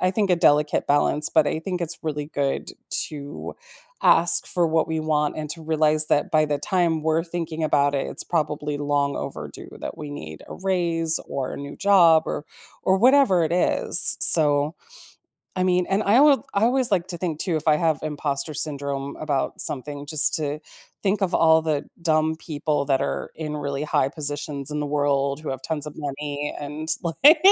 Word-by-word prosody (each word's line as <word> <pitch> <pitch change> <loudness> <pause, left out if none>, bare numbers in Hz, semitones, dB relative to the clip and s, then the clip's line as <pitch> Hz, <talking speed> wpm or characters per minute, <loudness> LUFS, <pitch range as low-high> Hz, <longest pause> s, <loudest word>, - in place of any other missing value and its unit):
I 185 - +2
think, 200 +1 0
a 180 - +4
delicate 150 -3 +2
balance, 145 +1 +2
but 155 -2 +3
I 155 - -1
think 180 +1 -4
it's 170 0 -2
really 150 -2 -4
good 140 -3 -3 0.4
to 145 -1 -8 0.5
ask 170 +1 +4
for 175 -1 +1
what 160 0 0
we 160 0 -2
want 150 -1 -1
and 155 -1 -5
to 165 0 -6
realize 155 -1 +1
that 145 - 0
by 155 -1 +4
the 145 -1 -2
time 170 -1 0
we're 160 +1 +1
thinking 165 -2 -5
about 145 -2 +2
it, 135 - -2
it's - - -3
probably 150 -3 -2
long 145 -1 0
overdue 75 - -7
that - - -6
we 150 -1 -8
need 80 - -9
a - - -8
raise 170 -4 0
or 135 -2 -4
a - - -6
new 140 0 -8
job 170 -6 +5
or - - -4 0.4
or 190 - +2
whatever 250 -8 +4
it 160 - -2
is, 180 - +5
so 150 0 +5 0.8
I 185 - 0
mean, 180 -1 +1
and 195 +2 +1
I 225 +7 +4
would 290 -2 +5
I 200 +3 +1
always 250 -1 +2
like 180 -3 +1
to 175 - -6
think, 165 -4 -3
too, 175 -4 -1
if 155 - -5
I 150 - +5
have 160 -3 0
impostor 150 0 -3
syndrome 140 -2 -3
about 145 -3 -2
something, 145 +1 -3
just 155 -1 +2
to 150 -1 -2 0.4
think 200 +1 0
of 185 - 0
all 160 -1 +4
the 155 -3 -1 0.2
dumb 160 -1 +1
people 150 -2 -2
that 135 -2 +1
are - - -3
in 150 -1 -5
really 140 0 -4
high 135 -2 +1
positions 145 -2 -4
in 150 - -3
the 145 - -2
world, 140 -1 0
who 155 - -7
have 130 0 -6
tons 155 -2 -4
of 150 - -8
money 145 0 -5
and, 150 +2 -7
like 275 - +5
155 Hz, 195 wpm, -23 LUFS, 145-170 Hz, 0.8 s, job